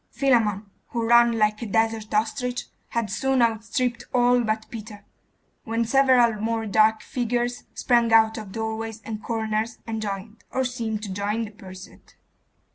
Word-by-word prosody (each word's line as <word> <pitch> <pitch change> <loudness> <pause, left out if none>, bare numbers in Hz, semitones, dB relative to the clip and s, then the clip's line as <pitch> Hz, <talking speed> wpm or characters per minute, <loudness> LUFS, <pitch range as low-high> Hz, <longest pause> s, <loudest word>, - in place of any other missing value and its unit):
Philammon, 225 -7 +1 0.2
who 230 -1 -2
ran 235 0 +5
like 215 0 +1
a 230 - -4
desert 225 0 0
ostrich, 245 +3 -1 0.2
had 230 -4 -2
soon 265 +5 +1
outstripped 235 +2 0
all 245 0 +4
but 220 0 -1
Peter, 210 -2 -9 0.6
when 230 +1 -1
several 245 -3 +4
more 225 0 -1
dark 215 +1 +3
figures 245 0 -2
sprang 235 -2 +2
out 220 0 +5
of 215 -4 -7
doorways 220 0 -4
and 215 -1 -5
corners 220 0 -2
and 220 -1 -4
joined, 210 +1 -6
or 260 0 -1
seem 230 -3 -2
to 205 -2 -6
join, 205 +3 -1
the 210 - -10
pursuit. 190 -3 -13
225 Hz, 150 wpm, -24 LUFS, 215-235 Hz, 0.6 s, ran